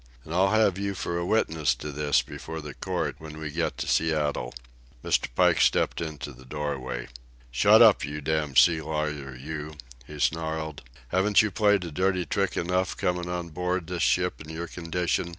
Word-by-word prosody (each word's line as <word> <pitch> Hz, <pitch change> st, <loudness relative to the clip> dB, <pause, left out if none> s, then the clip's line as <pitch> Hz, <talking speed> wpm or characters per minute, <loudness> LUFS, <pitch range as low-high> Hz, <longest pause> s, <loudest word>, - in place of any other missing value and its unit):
And 80 Hz, -, -7 dB
I'll 95 Hz, +3 st, +3 dB
have 105 Hz, -3 st, +3 dB
you 100 Hz, 0 st, -2 dB
for 85 Hz, -1 st, -2 dB
a 85 Hz, -, -2 dB
witness 80 Hz, -8 st, +1 dB
to 75 Hz, -, -6 dB
this 75 Hz, 0 st, +1 dB
before 80 Hz, -, -7 dB
the 75 Hz, -3 st, -8 dB
court -, -, -3 dB
when 75 Hz, -1 st, -9 dB
we 80 Hz, -1 st, -5 dB
get 80 Hz, +2 st, -2 dB
to -, -, -4 dB
Seattle." 75 Hz, -6 st, 0 dB, 0.5 s
Mr. -, -, +2 dB
Pike -, -, +4 dB
stepped -, -, +2 dB
into 75 Hz, -3 st, -5 dB
the 65 Hz, +1 st, -15 dB
doorway. 65 Hz, -3 st, -4 dB, 0.4 s
"Shut -, -, +6 dB
up, -, -, +6 dB
you 75 Hz, +2 st, -4 dB
damned 75 Hz, -2 st, -1 dB
sea 80 Hz, -2 st, +6 dB
lawyer, 75 Hz, -3 st, -3 dB
you," 75 Hz, +3 st, -6 dB, 0.3 s
he 75 Hz, 0 st, -9 dB
snarled. 80 Hz, -1 st, -1 dB, 0.3 s
"Haven't 100 Hz, +4 st, +4 dB
you 105 Hz, -, -1 dB
played 105 Hz, -1 st, +3 dB
a 85 Hz, -, -6 dB
dirty 95 Hz, +2 st, 0 dB
trick 100 Hz, -1 st, -1 dB
enough 90 Hz, +1 st, 0 dB
comin' 90 Hz, -1 st, -1 dB
on 90 Hz, -1 st, -3 dB
board 90 Hz, +2 st, -2 dB
this 90 Hz, 0 st, -4 dB
ship 90 Hz, 0 st, +1 dB
in 80 Hz, -, -10 dB
your 80 Hz, +2 st, -4 dB
condition? 85 Hz, +1 st, -2 dB
80 Hz, 185 wpm, -27 LUFS, 75-90 Hz, 0.5 s, Shut